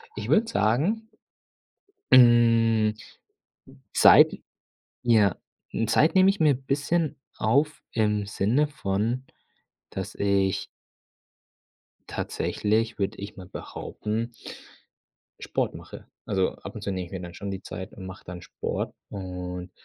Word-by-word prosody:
Ich 105 +2 -5
würde 215 - +4
sagen 185 - +1 1.0
hm, 115 -3 +6 1.0
Zeit, - - +7 0.7
ja 110 -6 +4 0.5
Zeit 155 +8 +3
nehme 190 0 +6
ich 195 - -3
mir 155 -2 +5
n' 135 0 -5
bisschen 145 +4 0 0.2
auf 140 +7 +1
im 105 -2 +1
Sinne 110 +9 +1
von, 115 -2 -2 0.7
dass - - -5
ich 100 -2 +1 1.5
tatsächlich, 110 +2 -1
würde 100 -1 -2
ich 100 +1 -8
mal 95 - -9
behaupten 110 +4 -5 1.1
Sport - - -1
mache. - - -11 0.2
Also, 95 -3 0
ab - - -10
und - - -7
zu 100 - -3
nehme 95 -1 -3
ich 85 - -15
mir 95 -2 -5
dann 85 -1 -8
schon 100 - -6
die 95 0 -5
Zeit 95 +3 -8
und 95 - -9
mache 95 0 -10
dann 90 0 -8
Sport - - -4 0.2
und 90 -2 -6
110 Hz, 125 wpm, -26 LUFS, 95-130 Hz, 1.5 s, Zeit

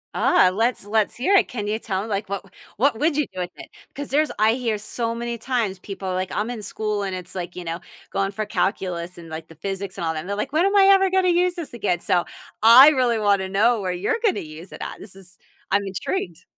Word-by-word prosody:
Ah, 185 - +4
let's 230 0 0
let's 215 0 +1
hear 275 +12 +1
it. 390 - +5
Can 210 -4 -5
you 215 +1 -1
tell 195 -3 -2
me, - - -7
like 205 -2 -3
What 200 0 -4 0.3
what 245 0 +2
would 305 0 +1
you 300 - +2
do 185 - -7
with 180 - -2
it? - - -11 0.3
'Cause 285 0 -5
there's 300 +3 +2
I 215 +1 +4
hear 235 -4 -1
so 230 +2 -3
many 235 -1 -4
times 225 -7 -1
people 195 0 -7
are 185 - -1
like, 185 0 -2
"I'm 220 +4 -2
in 230 - -6
school 210 0 -2
and 190 -2 -3
it's, 180 -1 -7
like, 180 -1 -5
you 180 - -6
know, 165 0 -4 0.3
going 195 0 0
for 215 +1 -3
calculus 180 -4 -2
and, 165 -1 -11
like, 160 0 -7
the 165 - -15
physics 195 +3 -5
and 170 - -3
all 160 - 0
that," 155 - -3
and 180 - -8
they're 200 - -1
like, 210 +6 -3
"When 335 +4 +3
am 400 - 0
I 395 -1 +7
ever 385 -1 +4
gonna 375 -1 +2
use 355 +1 +2
this 330 -7 -6
again?" 200 -6 -1
So, 175 0 +1 0.4
I 240 +6 +10
really 250 -6 +2
wanna 200 -3 +1
know 215 +3 +3
where 185 - -2
you're 185 - -1
gonna 420 - +2
use 160 +3 -10
it - - -10
at? - - -7
This 195 -2 -9
is 180 -2 -11 0.3
I'm 200 +1 +3
intrigued. 185 - -4
205 Hz, 255 wpm, -23 LUFS, 185-245 Hz, 0.4 s, I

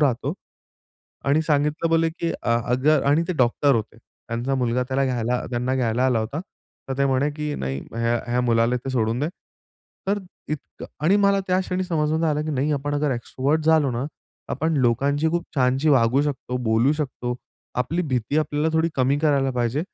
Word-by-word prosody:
राहतो. 130 -6 +1 0.9
आणि 145 +3 +3
सांगितलं 150 +1 +1
बोले, 165 0 +3
की 165 0 -3
"अ 115 0 +2
अगर 145 +5 +3
"आणि 145 +4 +4
ते - - +1
डॉक्टर 130 +2 +3
होते. 110 0 -3
त्यांचा 120 +3 -5
मुलगा 125 -1 +1
त्याला 135 +1 +1
घ्यायला 125 -1 -1
त्यांना 125 +1 -1
घ्यायला 125 -1 +1
आला 125 -3 +2
होता. 115 +8 -3 0.5
तर 135 - -3
ते 140 - +3
म्हणे, 135 +2 +1
की 150 0 -4
नाही 65 +1 -3
ह्या 115 +1 +1
ह्या 120 +1 +1
मुलाला 120 0 +2
ते 130 +2 -5
सोडून 115 -1 0
दे." 150 - 0 0.8
तर 205 +1 +1 0.3
इतकं 150 -2 -6 0.2
आणि 190 +6 +5
मला 200 0 +3
त्या 185 0 +2
क्षणी 185 0 -2
समजून 160 -2 0
आलं 150 -1 +1
की 155 - -3
नाही 145 +1 0
आपण 145 0 -1 0.2
एक्स्ट्राव्हर्ट 135 +5 -1
झालो 155 -3 +4
ना, 120 +2 -2 0.4
आपण 160 0 0
लोकांची 140 +5 +2
खूप 170 0 -1
छानशी 130 +3 +2
वागू 130 -1 +4
शकतो, 135 -3 -3
बोलू 120 +3 +2
शकतो. 125 -5 -3 0.4
आपली 145 +8 0
भीती 130 -2 -1
आपल्याला 150 +1 0
थोडी 160 +1 +2
कमी 135 +2 +2
करायला 140 -3 +2
पाहिजे 125 +3 0
135 Hz, 180 wpm, -23 LUFS, 125-155 Hz, 0.9 s, आणि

